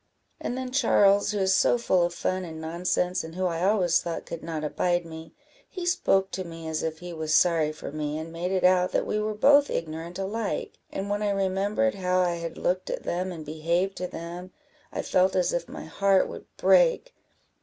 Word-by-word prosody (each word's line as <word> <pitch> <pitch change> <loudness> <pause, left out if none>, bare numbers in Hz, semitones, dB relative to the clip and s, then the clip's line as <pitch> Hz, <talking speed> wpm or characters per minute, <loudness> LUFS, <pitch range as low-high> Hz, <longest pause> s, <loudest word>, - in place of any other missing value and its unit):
And 245 - -3
then 260 -1 -4
Charles, 205 -6 +4
who 210 - -1
is 190 -1 +2
so 245 - +4
full 190 -6 +2
of 175 0 +1
fun 185 +2 -2
and 160 -2 -7
nonsense, 175 +2 -1
and 160 +1 -9
who 185 0 -1
I 170 -1 -1
always 185 -4 +3
thought 170 -2 -5
could 165 - -7
not 160 -2 -4
abide 175 +3 0
me, 160 0 -10 0.3
he 360 -2 -6
spoke 195 - +2
to 190 - -3
me 165 -2 -8
as 160 0 -2
if 160 -1 -3
he 175 +1 -8
was 155 -1 0
sorry 165 -3 +3
for 155 - -8
me, 150 0 -3
and 160 +1 -7
made 175 +2 -3
it 190 -1 0
out 180 0 +4
that - - +1
we 210 - -1
were 215 0 -2
both 285 +6 +5
ignorant 165 +2 -4
alike; 205 +3 -3
and 195 - -4
when 205 +1 -1
I 210 - +1
remembered 200 +7 +1
how 185 -1 0
I 175 -1 +1
had 170 0 -6
looked 185 +1 -1
at - - -4
them, 185 +2 -2
and 160 -3 -8
behaved 170 +5 -1
to 180 - -3
them, 175 +2 -8 0.4
I - - -3
felt 185 +1 +2
as 180 -1 +2
if 175 - -2
my - - -8
heart 195 +3 +2
would - - -9
break. - - +3
180 Hz, 215 wpm, -26 LUFS, 165-195 Hz, 0.4 s, both